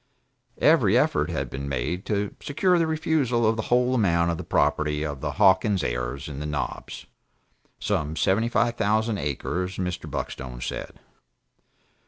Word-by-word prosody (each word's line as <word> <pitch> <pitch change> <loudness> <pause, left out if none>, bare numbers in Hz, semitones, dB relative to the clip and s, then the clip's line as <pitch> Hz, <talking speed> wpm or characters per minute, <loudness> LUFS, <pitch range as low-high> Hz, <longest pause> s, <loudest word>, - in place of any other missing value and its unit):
Every - - +4
effort - - +2
had - - -2
been 70 +1 -5
made 70 +8 -3
to 105 -1 -1
secure 180 +5 +2
the 165 - +2
refusal 150 -7 +1
of 110 +1 +3
the 110 - -2
whole 125 +1 +3
amount 85 -8 +2
of 85 - -3
the - - -4
property 75 0 +1
of 70 -3 -5
the - - -2
Hawkins 95 0 +3
heirs - - -3
in 70 -2 -6
the 75 - -4
Knobs, 75 -4 -4 0.7
some 75 +1 -1
seventy 95 +9 +2
five 120 0 +2
thousand 110 0 +1
acres 90 +6 -3
Mr. 90 -2 -3
Buckstone 65 -2 -5
said. - - -5
95 Hz, 155 wpm, -25 LUFS, 75-115 Hz, 0.7 s, Every